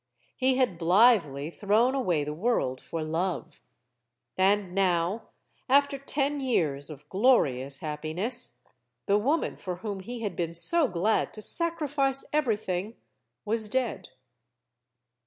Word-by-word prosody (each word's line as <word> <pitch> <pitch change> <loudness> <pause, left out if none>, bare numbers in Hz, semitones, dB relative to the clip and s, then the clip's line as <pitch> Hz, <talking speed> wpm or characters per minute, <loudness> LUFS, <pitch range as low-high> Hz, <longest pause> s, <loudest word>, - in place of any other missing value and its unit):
He 260 0 +1
had 245 -10 0
blithely 170 - +3
thrown 215 +7 +2
away 180 - 0
the 150 +1 -4
world 160 - -1
for 165 -1 -5
love. 165 +3 -3 0.7
And 195 0 +1
now, 185 +2 0 0.4
after 280 +1 +3
ten 280 +1 -1
years 155 - -1
of 145 -1 -11
glorious 140 - +1
happiness, 155 - -1 0.4
the 200 +1 +3
woman 290 +9 0
for 180 -2 -5
whom 200 +1 -5
he 235 +5 -7
had 205 -5 -3
been 170 -1 -3
so 325 - +5
glad 205 +3 0
to 215 - -8
sacrifice 290 -5 +1
everything, 220 -7 -1 0.5
was 215 0 0
dead. 235 -6 -2
200 Hz, 120 wpm, -27 LUFS, 165-255 Hz, 0.7 s, so